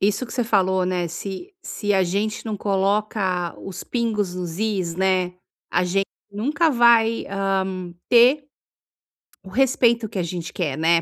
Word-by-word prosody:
isso 205 +5 +1
que 235 - -10
você 245 - 0
falou, 190 -4 +2
né, 180 -2 -1
se 195 - -7
se 205 -1 -2
a 190 - +4
gente 205 +4 -2
não 215 -2 -2
coloca 195 -3 0
os 190 -1 -7
pingos 215 -6 -1
nos 175 -2 -5
is, 195 -6 -1
né, 185 -1 +1 0.4
a 180 - +3
gente 195 +2 0 0.3
nunca 295 +10 +1
vai, 235 -3 +4
hã, 190 -2 -2 0.2
ter 255 +4 +5 1.0
o 190 - -11
respeito 235 -1 +2
que 200 - -7
a 180 - 0
gente 170 -1 -5
quer, 150 -7 -2
né. 165 +1 +3
195 Hz, 160 wpm, -22 LUFS, 180-225 Hz, 1.0 s, ter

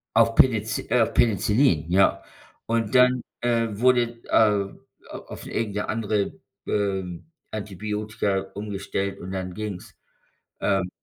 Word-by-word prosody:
Auf 115 0 +4
Penic 110 -4 +2
äh, 120 0 +4
Penicillin, 105 - +2
ja. 95 +2 +3 0.4
Und 115 0 -1
dann, 125 0 +5 0.2
äh, 115 -1 +2
wurde 120 +1 +2
äh, - - -17
a 105 -3 +3 0.5
auf - - -9
irgend 110 -3 -3
'ne 105 - -2
andere, 105 -2 0 0.3
ähm, 95 - -2 0.2
Antibiotika 105 -1 -2
umgestellt 100 -1 -3
und 95 - -7
dann 95 -1 -4
ging's. 105 -2 -6 0.6
Ähm 95 -2 +1
105 Hz, 120 wpm, -25 LUFS, 100-115 Hz, 0.6 s, dann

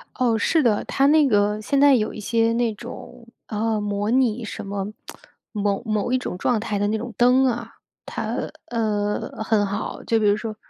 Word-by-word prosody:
哦， 240 -3 +2
是 320 +7 +2
的。 220 -5 +2
它 275 - +2
那 300 0 +5
个 210 -2 +2
现 275 +6 0
在 285 -1 +7
有 215 -3 0
一 - - -8
些 230 +2 +1
那 235 -1 0
种， 240 +1 -10 0.2
呃， 220 0 -1
模 205 +1 -1
拟 250 -2 +2
什 - - -6
么 195 0 -3 0.7
某 205 -2 -1
某 215 +2 -1
一 255 - +3
种 215 -8 -5
状 235 +3 +1
态 210 -1 -2
的 205 +1 +1
那 220 - 0
种 235 +1 -6
灯 250 +2 +5
啊。 235 -2 -2 0.3
它， - - -4 0.3
呃， 215 -2 -2
很 215 -2 +2
好， 200 +1 -4
就 225 - +1
比 215 - +1
如 205 - +4
说 215 0 -5
225 Hz, 210 characters per minute, -23 LUFS, 210-245 Hz, 0.7 s, 在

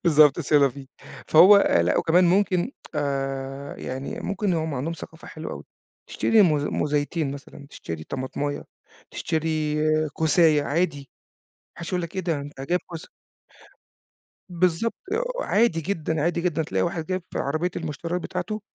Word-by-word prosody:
بالضبط 150 -2 +5
C'est 150 -1 +3
la 140 - +5
vie. 135 +1 -10 0.4
فهو 180 +6 +8
لأ 85 - +3
وكمان 175 +3 +4
ممكن 185 +3 +2 0.2
آآ 135 -1 -3
يعني 130 +2 -5
ممكن 200 -1 -1
هم 160 -2 -2
عندهم 140 +6 -2
ثقافة 160 0 -10
حلوة 155 0 -7
أوي، - - -8 0.4
تشتري 225 -2 +3
موز 150 -6 +2
موزَيتين 145 0 -1
مثلًا، 140 0 -11
تشتري 80 - -7
طماطماية، 140 - -4 0.5
تشتري 155 -1 -1 0.4
كوساية 160 -1 +3
عادي، 160 +1 0
ما 140 - -20 0.5
حَدّش 170 0 -6
هيقول 180 -1 -1
لك 170 +1 -7
إيه - - +1
ده؟ 165 -5 -1
أنت 140 -1 -9
جايب 175 +7 0
كوسة. 165 -2 -9 1.4
بالضبط. 180 +5 +1 0.5
وعادي 215 - +2
جدًا، 160 -3 -2
عادي 170 +2 0
جدًا. 170 -2 0
تلاقي 150 - -1
واحد 170 -2 -2
جايب 185 +2 -2
في - - -2
عربية 155 +6 -1
المشتريات 165 +2 -3
بتاعته 200 +5 -4
160 Hz, 145 wpm, -24 LUFS, 145-175 Hz, 1.4 s, فهو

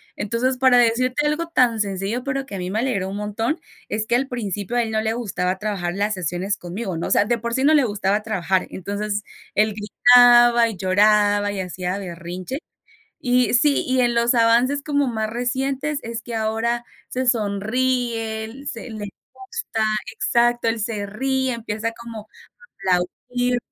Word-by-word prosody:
entonces, 245 +4 -1
para 255 -1 +5
decirte 250 +4 +2
algo 310 +3 0
tan 245 -8 +2
sencillo, 200 +4 -2
pero 270 0 -2
que 205 - -12
a - - -4
mí 180 0 -4
me 210 - -2
alegró 205 -7 -1
un 195 - -5
montón, 225 +9 -2 0.3
es 215 +1 -1
que 235 - +1
al 265 +2 +1
principio 210 -3 -4
a 240 - +3
él 220 - -4
no 220 0 +1
le 220 0 0
gustaba 185 -5 -2
trabajar 195 -5 -2
las 205 +2 0
sesiones 185 +3 -2
conmigo, 185 0 -5
¿no?, 170 - -3
o - - -4
sea, 205 - +4
de 235 +1 0
por 235 +1 -4
sí 265 - 0
no 310 +2 +5
le 290 -3 +5
gustaba 205 -1 0
trabajar, 190 -3 0
entonces, 205 +2 -3 0.3
él 215 0 +3
gritaba 240 +2 +6
y 215 - -6
lloraba 205 +2 +3
y 200 - -4
hacía 180 +1 -3
berrinche, 180 - -6 0.6
y 250 -1 +2
sí, 285 +3 +4
y 260 0 +1
en 240 -1 +2
los 235 +1 +3
avances 240 +5 +3
como 285 -2 +1
más 220 -2 -2
recientes, 265 +5 -1
es 230 0 -4
que 235 0 -8
ahora 225 +2 -1 0.2
se 255 +1 -2
sonríe, 225 +2 -1
se, 230 +2 -8
le 215 -1 -6 0.3
gusta, 260 -4 -4 0.3
exacto, 240 0 +2
él 225 0 -2
se 210 -2 -2
ríe, 260 +5 -1
empieza 230 -1 -3
como 230 -2 -10 0.6
a 180 - +6
aplaudir, 245 +7 -2
225 Hz, 175 wpm, -22 LUFS, 205-245 Hz, 0.6 s, gritaba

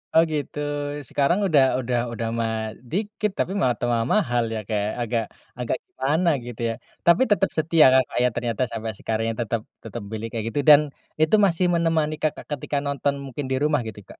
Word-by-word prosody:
Oh 165 - +7
gitu 150 0 -3 0.5
sekarang 160 +7 +2
udah 145 -6 +5 0.2
udah 125 -1 0
udah 115 0 -3
malah 110 -1 -1 0.3
dikit 210 +2 -1
tapi 185 - 0
malah 125 -2 +2
tambah 120 -1 +1
mahal 120 - +2
ya 110 - -2
Kak 110 - -1
ya - - -1
agak 115 -1 0 0.4
agak 120 - -1
gimana 155 +7 0 0.2
gitu 120 -1 -8
ya? - - -1 0.3
Tapi 170 +4 +5
tetep 195 -1 +3
setia 160 0 +5
Kakak 130 -1 +2
ya? 125 - +4
Ternyata 120 0 -1
sampai 110 -1 -3
sekarang 110 0 -2
ya - - -1
tetep 115 0 -1 0.2
tetep 120 - -6
milih 110 +1 -4
kayak 115 -2 -3
gitu 145 - -2
dan 145 -1 +10 0.4
itu 155 +7 +5
masih 180 0 +2
menemani 160 -2 +1
Kakak 155 - -2
ketika 145 +1 -2
nonton 140 0 0
mungkin 135 +1 -5
di - - +2
rumah 145 -2 +2
gitu, 105 -2 -7
Kak? - - -12
135 Hz, 195 wpm, -24 LUFS, 115-160 Hz, 0.5 s, dan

